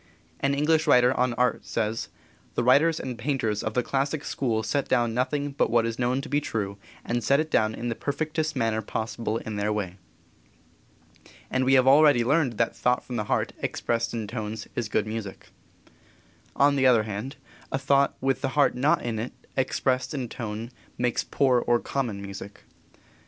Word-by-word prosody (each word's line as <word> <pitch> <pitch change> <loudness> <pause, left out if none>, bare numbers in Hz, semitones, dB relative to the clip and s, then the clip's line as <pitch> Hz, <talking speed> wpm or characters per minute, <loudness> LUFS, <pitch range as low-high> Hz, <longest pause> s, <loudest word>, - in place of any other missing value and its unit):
An 140 0 +1
English 155 +2 +2
writer 125 -2 +5
on 125 -1 +1
art 125 0 +1
says: 110 0 -2 0.5
"The - - +1
writers 150 +6 +4
and 125 -3 -5
painters 115 -5 -1
of 110 - -4
the 125 - +2
classic 140 +3 -1
school 115 -5 -1
set 140 +6 -1
down 120 -3 +1
nothing 140 +4 -1
but 140 - +1
what 115 -1 +3
is 115 +1 -3
known 125 +2 +1
to - - -8
be 145 +2 +1
true, 100 -7 -3 0.3
and 120 0 -1
set 140 +1 +3
it 155 0 -2
down 110 0 +2
in 120 - -4
the - - 0
perfectest 155 +4 -2
manner 115 -3 0
possible 110 +1 -3
in 110 -2 -5
their 105 +1 0
way." 100 -4 -3 1.5
And 130 0 +1
we 135 +1 +5
have 130 -1 +5
already 140 -2 +6
learned 140 0 +2
that 115 +1 0
thought 125 0 +1
from 125 - -5
the 105 - -2
heart, - - 0
expressed 115 0 -1
in 115 -2 -3
tones, 110 0 -5
is 115 -4 -2
good 105 - +1
music. 110 -3 -6 1.1
On 140 +1 +4
the 130 -1 +4
other 120 -4 +5
hand, 110 +6 -5 0.4
a - - 0
thought 140 0 +2
with 135 -1 0
the 135 - 0
heart 145 - +4
not 145 +7 +2
in 115 -2 -2
it, 115 +3 -4 0.2
expressed 130 +1 0
in 125 -4 -3
tone, 115 0 -5 0.3
makes 125 -1 0
poor 130 -3 +2
or 120 0 +2
common 115 -8 -3
music. 100 +1 -9
125 Hz, 185 wpm, -26 LUFS, 110-140 Hz, 1.5 s, already